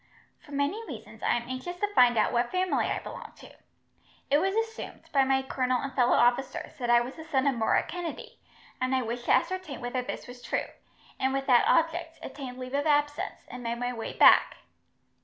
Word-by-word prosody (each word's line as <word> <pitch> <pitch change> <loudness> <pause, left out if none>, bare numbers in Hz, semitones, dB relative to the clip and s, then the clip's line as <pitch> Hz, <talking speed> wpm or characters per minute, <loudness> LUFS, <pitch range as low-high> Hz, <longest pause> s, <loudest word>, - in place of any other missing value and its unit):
For - - -17
many 285 +11 -1
reasons, - - -10
I - - +2
am 240 0 -3
anxious 260 +8 -5
to 415 +2 -2
find 245 - +5
out 215 - +2
what 240 0 +1
family 370 0 0
I - - -1
belong - - -8
to. - - -14 0.8
It 290 - +5
was 385 +4 0
assumed, 450 0 -4
by 275 -2 +5
my 265 0 +2
colonel 255 -1 0
and 275 +1 -5
fellow 250 -2 +3
officers, 245 +3 +1
that 240 -1 -2
I 240 0 +6
was 250 +5 -6
the 320 - -8
son 280 -4 0
of 280 - +3
Murroch 225 -2 +1
Kennedy, 350 -2 -6 0.4
and 255 +1 +1
I 260 - +1
wished 240 +1 -5
to - - +1
ascertain 340 -6 0
whether 245 +1 -2
this 250 - -6
was 245 0 -11
true, - - -2 0.5
and 265 0 +1
with 270 0 -1
that 245 -3 +5
object 330 0 +1
obtained 255 -3 -7
leave 255 0 -7
of 285 +2 0
absence, 290 -1 0
and 250 - -8
made 235 0 -3
my 245 +1 -2
way 225 -2 -5
back." - - +6
265 Hz, 210 wpm, -28 LUFS, 245-320 Hz, 0.8 s, I